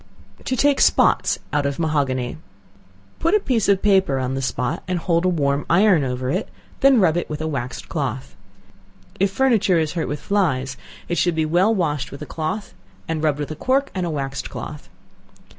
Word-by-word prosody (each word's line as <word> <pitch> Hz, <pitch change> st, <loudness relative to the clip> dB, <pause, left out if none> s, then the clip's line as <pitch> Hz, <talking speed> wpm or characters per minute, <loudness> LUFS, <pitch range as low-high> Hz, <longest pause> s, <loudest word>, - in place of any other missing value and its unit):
To 260 Hz, -, 0 dB
Take 285 Hz, +2 st, +3 dB
Spots -, -, +3 dB, 0.2 s
out 145 Hz, -1 st, +1 dB
of 140 Hz, -, -3 dB
Mahogany. 140 Hz, -5 st, -1 dB, 0.8 s
Put 335 Hz, +5 st, +2 dB
a -, -, +5 dB
piece 240 Hz, -, 0 dB
of 195 Hz, -1 st, +3 dB
paper 190 Hz, -9 st, +3 dB
on 130 Hz, 0 st, -2 dB
the 135 Hz, -, -2 dB
spot, 130 Hz, +4 st, -2 dB
and 180 Hz, -1 st, -1 dB
hold 170 Hz, 0 st, 0 dB
a -, -, +4 dB
warm 145 Hz, -4 st, 0 dB
iron 185 Hz, -2 st, +4 dB
over 125 Hz, 0 st, -2 dB
it, 185 Hz, +7 st, -2 dB, 0.3 s
then 270 Hz, -3 st, +5 dB
rub 175 Hz, -4 st, +3 dB
it 175 Hz, -, -2 dB
with 150 Hz, -1 st, -4 dB
a 155 Hz, -, -3 dB
waxed 130 Hz, -5 st, -4 dB
cloth. 65 Hz, -1 st, -4 dB, 0.8 s
If 195 Hz, +1 st, +3 dB
furniture 215 Hz, -5 st, +2 dB
is 155 Hz, -2 st, 0 dB
hurt 170 Hz, -3 st, -2 dB
with 145 Hz, -, -3 dB
flies, 135 Hz, -10 st, 0 dB, 0.3 s
it 175 Hz, -, -1 dB
should 175 Hz, -2 st, +1 dB
be 160 Hz, -1 st, +1 dB
well 180 Hz, +8 st, +3 dB
washed 150 Hz, -7 st, -1 dB
with 140 Hz, +2 st, -8 dB
a -, -, -6 dB
cloth, 160 Hz, +8 st, -4 dB, 0.3 s
and 160 Hz, -1 st, -2 dB
rubbed 150 Hz, -2 st, +2 dB
with 145 Hz, 0 st, -4 dB
a -, -, -4 dB
cork 270 Hz, -, 0 dB
and 185 Hz, -, -2 dB
a 175 Hz, -, -1 dB
waxed 135 Hz, -3 st, -4 dB
cloth. 150 Hz, -, -8 dB
160 Hz, 195 wpm, -21 LUFS, 140-195 Hz, 0.8 s, a